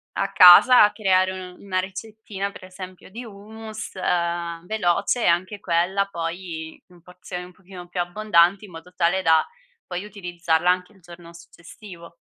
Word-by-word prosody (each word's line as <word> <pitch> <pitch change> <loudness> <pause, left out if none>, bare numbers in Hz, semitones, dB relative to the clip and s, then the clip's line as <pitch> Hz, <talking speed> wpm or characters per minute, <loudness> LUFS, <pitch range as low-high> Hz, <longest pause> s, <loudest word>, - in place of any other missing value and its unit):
a 195 0 -2
casa 205 +5 +8
creare, 185 -3 +1
uhm, 185 -1 -10
una 185 -2 -2
ricettina 200 +1 -6
per 185 - -13
esempio 185 0 -11
di 235 +5 -9
hummus, 220 +1 -10
ehm, 170 -2 -2
veloce 215 +3 0
e - - +2
anche 185 +4 0
quella 185 +3 0
poi 165 -1 -6
in 175 -1 -20
porzioni 180 0 -9
un 180 - -16
pochino 180 -1 -13
più 175 0 -3
abbondanti 190 0 +2
in 195 - -15
modo 165 +2 -13
tale 180 +2 +1
da 160 -3 +3 0.4
poi 180 +1 -5
utilizzarla 175 -4 -2
anche 180 +2 0
il 195 - -23
giorno 170 -1 -14
successivo. 170 +1 -14
180 Hz, 155 wpm, -22 LUFS, 175-200 Hz, 0.4 s, casa